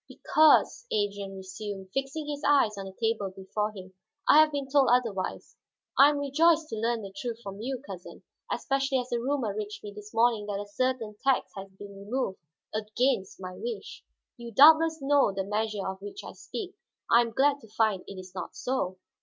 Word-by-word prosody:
"Because," 315 Hz, +10 st, +3 dB
Adrian 200 Hz, -1 st, -2 dB
resumed, 190 Hz, 0 st, -7 dB
fixing 275 Hz, +3 st, -2 dB
his 290 Hz, -1 st, -4 dB
eyes 275 Hz, -7 st, +4 dB
on 195 Hz, -1 st, -6 dB
the 190 Hz, -, -7 dB
table 220 Hz, -1 st, -1 dB
before 195 Hz, +3 st, -3 dB
him, 190 Hz, -2 st, -11 dB, 0.3 s
"I 300 Hz, -, +8 dB
have 310 Hz, 0 st, +6 dB
been 285 Hz, -2 st, -3 dB
told 270 Hz, -1 st, +4 dB
otherwise. 225 Hz, -7 st, -1 dB, 0.4 s
I 280 Hz, +2 st, +8 dB
am 295 Hz, -, -1 dB
rejoiced 310 Hz, +3 st, +3 dB
to -, -, -4 dB
learn 230 Hz, 0 st, -1 dB
the 195 Hz, -1 st, -8 dB
truth 230 Hz, +2 st, -4 dB
from 195 Hz, +1 st, -7 dB
you, 260 Hz, +2 st, -4 dB
cousin; 185 Hz, -5 st, -10 dB, 0.3 s
especially 270 Hz, -1 st, 0 dB
as 250 Hz, -1 st, -3 dB
a 240 Hz, -, +1 dB
rumor 250 Hz, -4 st, -1 dB
reached 210 Hz, 0 st, -5 dB
me 205 Hz, -1 st, -7 dB
this 210 Hz, 0 st, -11 dB
morning 225 Hz, -2 st, +2 dB
that 200 Hz, -1 st, -3 dB
a 205 Hz, -, -5 dB
certain 225 Hz, 0 st, -2 dB
tax 270 Hz, -1 st, +2 dB
had 195 Hz, -1 st, -9 dB
been 200 Hz, 0 st, -10 dB
removed, 200 Hz, 0 st, -3 dB, 0.3 s
against 215 Hz, 0 st, -1 dB
my 185 Hz, -1 st, -7 dB
wish. 470 Hz, -2 st, -6 dB, 0.3 s
You 235 Hz, -1 st, -8 dB
doubtless 315 Hz, +4 st, +6 dB
know 280 Hz, -5 st, +4 dB
the 195 Hz, 0 st, -2 dB
measure 210 Hz, 0 st, -2 dB
of 190 Hz, 0 st, -5 dB
which 405 Hz, -1 st, -8 dB
I -, -, -8 dB
speak. 390 Hz, -4 st, -7 dB, 0.4 s
I 235 Hz, -, +7 dB
am 235 Hz, -, -1 dB
glad 280 Hz, +4 st, +2 dB
to 225 Hz, -, -14 dB
find 215 Hz, -3 st, +1 dB
it 195 Hz, -, -8 dB
is 185 Hz, 0 st, -11 dB
not 185 Hz, -2 st, -6 dB
so." 220 Hz, -8 st, -2 dB
225 Hz, 195 wpm, -28 LUFS, 200-275 Hz, 0.4 s, I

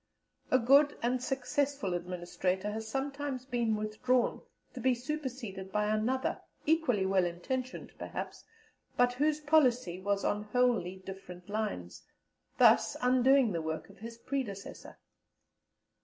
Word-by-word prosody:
A 255 Hz, -, +5 dB
good 280 Hz, +4 st, +5 dB
and 245 Hz, +1 st, +1 dB
successful 270 Hz, -, -1 dB
Administrator 180 Hz, +2 st, -2 dB
has 220 Hz, +1 st, -5 dB
sometimes 275 Hz, +1 st, -3 dB
been 235 Hz, -4 st, 0 dB
withdrawn 215 Hz, +4 st, 0 dB, 0.3 s
to 255 Hz, -, -7 dB
be 255 Hz, +1 st, +3 dB
superseded 245 Hz, -8 st, -5 dB
by 210 Hz, +1 st, +1 dB
another, 250 Hz, +5 st, 0 dB, 0.2 s
equally 290 Hz, -11 st, +2 dB
well 190 Hz, -1 st, +3 dB
intentioned, 250 Hz, +10 st, -4 dB
perhaps, -, -, -6 dB, 0.5 s
but 245 Hz, 0 st, +4 dB
whose 300 Hz, +4 st, +1 dB
policy 255 Hz, -, +3 dB
was 200 Hz, +1 st, -1 dB
on 210 Hz, 0 st, 0 dB
wholly 230 Hz, -5 st, +1 dB
different 180 Hz, -1 st, -9 dB
lines, 205 Hz, -, -3 dB, 0.6 s
thus -, -, +5 dB
undoing 255 Hz, -1 st, +4 dB
the 170 Hz, -3 st, -1 dB
work 160 Hz, +4 st, -4 dB
of 200 Hz, -, -19 dB
his 230 Hz, +2 st, -8 dB
predecessor. 235 Hz, -6 st, -5 dB
235 Hz, 125 wpm, -31 LUFS, 195-260 Hz, 0.6 s, A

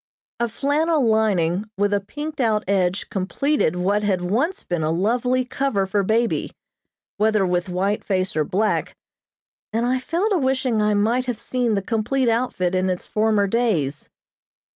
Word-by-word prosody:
A 235 Hz, -, +1 dB
flannel 290 Hz, +4 st, +1 dB
lining 205 Hz, -3 st, +1 dB
with 205 Hz, +1 st, +1 dB
a 205 Hz, -, +3 dB
pinked 295 Hz, +8 st, -6 dB
out 220 Hz, -3 st, +1 dB
edge 190 Hz, -1 st, 0 dB
completed 200 Hz, -, 0 dB
what 195 Hz, +4 st, +1 dB
had 195 Hz, -3 st, 0 dB
once 255 Hz, -, -1 dB
been 175 Hz, -2 st, -2 dB
a 155 Hz, -, 0 dB
lovely 245 Hz, +9 st, +1 dB
cover 250 Hz, -6 st, -1 dB
for 200 Hz, +1 st, 0 dB
baby, 225 Hz, +4 st, 0 dB, 0.6 s
whether 215 Hz, -1 st, +2 dB
with 180 Hz, 0 st, -1 dB
white 195 Hz, +4 st, -1 dB
face 190 Hz, 0 st, -1 dB
or 155 Hz, -, +2 dB
black, 205 Hz, +6 st, -1 dB, 0.8 s
and 230 Hz, +2 st, 0 dB
I 255 Hz, +1 st, +1 dB
fell 335 Hz, +10 st, -1 dB
to 380 Hz, -, +2 dB
wishing 260 Hz, -4 st, +1 dB
I 210 Hz, 0 st, +2 dB
might 230 Hz, +5 st, +1 dB
have 245 Hz, -3 st, -2 dB
seen 245 Hz, -4 st, 0 dB
the 195 Hz, -, -1 dB
complete 235 Hz, +4 st, 0 dB
outfit 225 Hz, -6 st, 0 dB
in 185 Hz, 0 st, +1 dB
its 180 Hz, -1 st, -3 dB
former 215 Hz, -1 st, +1 dB
days. 195 Hz, -, -1 dB
215 Hz, 165 wpm, -22 LUFS, 190-250 Hz, 0.8 s, a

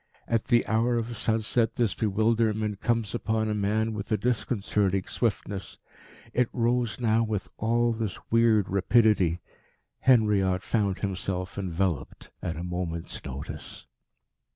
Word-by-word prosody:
At 115 Hz, -2 st, 0 dB
the 120 Hz, -2 st, +3 dB
hour 115 Hz, +2 st, +1 dB
of 115 Hz, +1 st, -3 dB
sunset 115 Hz, +1 st, +1 dB
this 115 Hz, -4 st, +1 dB
bewilderment 110 Hz, 0 st, +1 dB
comes 115 Hz, -4 st, 0 dB
upon 110 Hz, -2 st, 0 dB
a -, -, +1 dB
man 110 Hz, +2 st, 0 dB
with 105 Hz, 0 st, -6 dB
a 110 Hz, -, +3 dB
disconcerting 105 Hz, -5 st, 0 dB
swiftness. 100 Hz, -4 st, -2 dB, 0.6 s
It 125 Hz, -1 st, +2 dB
rose 120 Hz, -1 st, 0 dB
now 115 Hz, -2 st, +2 dB
with 110 Hz, -3 st, -2 dB
all 120 Hz, +1 st, +2 dB
this 110 Hz, -3 st, -3 dB
weird 115 Hz, -3 st, +4 dB
rapidity. 100 Hz, -3 st, +3 dB, 0.6 s
Henriot 105 Hz, -7 st, +3 dB
found 105 Hz, -4 st, 0 dB
himself 95 Hz, -2 st, -3 dB
enveloped 95 Hz, -4 st, -3 dB
at 85 Hz, -3 st, -3 dB
a 85 Hz, -, -4 dB
moment's 90 Hz, -2 st, -4 dB
notice. 70 Hz, +1 st, -7 dB
110 Hz, 130 wpm, -27 LUFS, 95-115 Hz, 0.6 s, weird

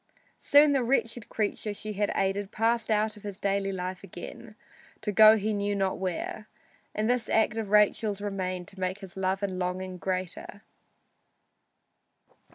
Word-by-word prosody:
Soon 290 Hz, +1 st, +6 dB
the 270 Hz, -3 st, +2 dB
wretched 230 Hz, -2 st, 0 dB
creature 210 Hz, -1 st, -2 dB
she 215 Hz, +1 st, -5 dB
had 205 Hz, 0 st, 0 dB
aided 195 Hz, +1 st, 0 dB
passed 230 Hz, +1 st, +1 dB
out 215 Hz, 0 st, +1 dB
of 210 Hz, -, -14 dB
his 205 Hz, -1 st, -7 dB
daily 195 Hz, 0 st, 0 dB
life 185 Hz, 0 st, -5 dB
again 205 Hz, +4 st, -10 dB, 0.5 s
to 210 Hz, -, -2 dB
go 215 Hz, +1 st, +8 dB
he 215 Hz, +1 st, -1 dB
knew 205 Hz, 0 st, -1 dB
not 195 Hz, -1 st, -1 dB
where, 190 Hz, +3 st, -4 dB, 0.5 s
and 215 Hz, +1 st, 0 dB
this 245 Hz, -2 st, +1 dB
act 220 Hz, 0 st, +2 dB
of 220 Hz, -3 st, -3 dB
Rachel's 210 Hz, 0 st, +3 dB
remained 185 Hz, -3 st, -3 dB
to 190 Hz, -, -15 dB
make 185 Hz, +2 st, -2 dB
his 190 Hz, -2 st, -10 dB
love 190 Hz, +1 st, -1 dB
and 190 Hz, -2 st, -2 dB
longing 185 Hz, 0 st, -3 dB
greater. 185 Hz, +2 st, -4 dB
205 Hz, 160 wpm, -28 LUFS, 190-215 Hz, 0.5 s, go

